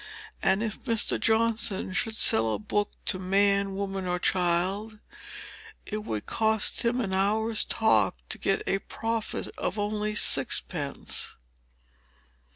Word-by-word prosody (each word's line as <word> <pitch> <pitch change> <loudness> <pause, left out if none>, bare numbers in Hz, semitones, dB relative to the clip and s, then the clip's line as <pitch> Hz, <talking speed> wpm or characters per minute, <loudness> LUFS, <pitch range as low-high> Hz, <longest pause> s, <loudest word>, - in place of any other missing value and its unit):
And 190 +3 +1
if 220 +2 -6
Mr. 230 -4 +2
Johnson 225 -3 +1
should 220 +3 -1
sell 110 - +5
a - - -4
book 205 -1 -2
to 185 - 0
man, 200 +1 +1
woman, 195 -1 -4
or 180 0 -1
child, 185 +5 -1 0.9
it 215 0 -5
would 110 - -5
cost 220 -1 +1
him 240 +2 0
an 195 -6 -3
hour's 215 +3 +1
talk 110 - +2
to - - -1
get - - -1
a 195 - 0
profit 225 +2 -4
of - - -3
only 210 +1 -2
sixpence. - - +2
205 Hz, 130 wpm, -26 LUFS, 190-220 Hz, 0.9 s, sell